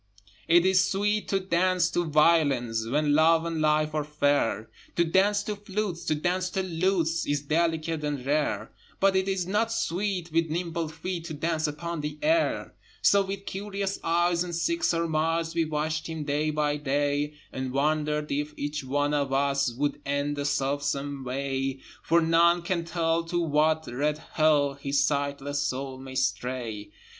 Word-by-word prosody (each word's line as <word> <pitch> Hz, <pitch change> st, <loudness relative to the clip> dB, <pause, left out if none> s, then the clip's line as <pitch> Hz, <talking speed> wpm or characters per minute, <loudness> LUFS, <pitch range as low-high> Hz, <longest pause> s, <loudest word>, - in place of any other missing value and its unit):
It 170 Hz, +2 st, +5 dB
is 190 Hz, 0 st, +5 dB
sweet 210 Hz, +2 st, 0 dB
to 195 Hz, -, +1 dB
dance 185 Hz, -1 st, +1 dB
to 175 Hz, -, +1 dB
violins 145 Hz, -8 st, +2 dB
When 145 Hz, +2 st, +2 dB
Love 160 Hz, +2 st, +4 dB
and 165 Hz, -2 st, -2 dB
Life 155 Hz, 0 st, +2 dB
are 155 Hz, -1 st, 0 dB
fair: 145 Hz, -7 st, 0 dB, 0.2 s
To 170 Hz, -, +3 dB
dance 200 Hz, +4 st, +2 dB
to 210 Hz, -, -3 dB
flutes, 200 Hz, -3 st, -4 dB
to 155 Hz, -, +1 dB
dance 180 Hz, +4 st, -1 dB
to 190 Hz, +1 st, -2 dB
lutes 170 Hz, -2 st, 0 dB
Is 145 Hz, 0 st, 0 dB
delicate 160 Hz, 0 st, 0 dB
and 145 Hz, -4 st, -3 dB
rare: 140 Hz, -7 st, 0 dB, 0.3 s
But 195 Hz, 0 st, +3 dB
it 190 Hz, 0 st, +1 dB
is 190 Hz, -2 st, 0 dB
not 210 Hz, +5 st, 0 dB
sweet 185 Hz, -4 st, -2 dB
with 165 Hz, 0 st, +1 dB
nimble 170 Hz, 0 st, -2 dB
feet 165 Hz, +2 st, -5 dB
To 160 Hz, -2 st, -5 dB
dance 160 Hz, +1 st, 0 dB
upon 165 Hz, +2 st, -4 dB
the 150 Hz, 0 st, -4 dB
air! 325 Hz, +2 st, +1 dB, 0.3 s
So 200 Hz, 0 st, +5 dB
with 195 Hz, +1 st, -6 dB
curious 195 Hz, 0 st, -3 dB
eyes 175 Hz, +1 st, +2 dB
and 175 Hz, -1 st, -5 dB
sick 335 Hz, -, -1 dB
surmise 165 Hz, -, +1 dB
We 165 Hz, -1 st, +1 dB
watched 155 Hz, 0 st, -2 dB
him 160 Hz, -2 st, -4 dB
day 150 Hz, +1 st, 0 dB
by 150 Hz, -1 st, 0 dB
day, 145 Hz, +1 st, 0 dB, 0.2 s
And 130 Hz, -1 st, -3 dB
wondered 150 Hz, +2 st, 0 dB
if 150 Hz, +1 st, -2 dB
each 145 Hz, 0 st, -3 dB
one 145 Hz, +2 st, 0 dB
of 140 Hz, -2 st, 0 dB
us 140 Hz, -1 st, +1 dB
Would 145 Hz, +5 st, -2 dB
end 140 Hz, +1 st, -1 dB
the 145 Hz, 0 st, -3 dB
self 140 Hz, 0 st, 0 dB
same 140 Hz, -1 st, -3 dB
way, 135 Hz, +1 st, -2 dB, 0.2 s
For 170 Hz, +1 st, +3 dB
none 170 Hz, +1 st, +4 dB
can 170 Hz, -1 st, -1 dB
tell 165 Hz, -1 st, 0 dB
to 175 Hz, +1 st, -1 dB
what 160 Hz, 0 st, +2 dB
red 145 Hz, +5 st, -1 dB
Hell 150 Hz, -3 st, +2 dB
His 140 Hz, 0 st, 0 dB
sightless 145 Hz, 0 st, -1 dB
soul 130 Hz, 0 st, -3 dB
may 130 Hz, 0 st, -9 dB
stray. 125 Hz, -5 st, -2 dB
155 Hz, 170 wpm, -27 LUFS, 145-170 Hz, 0.3 s, It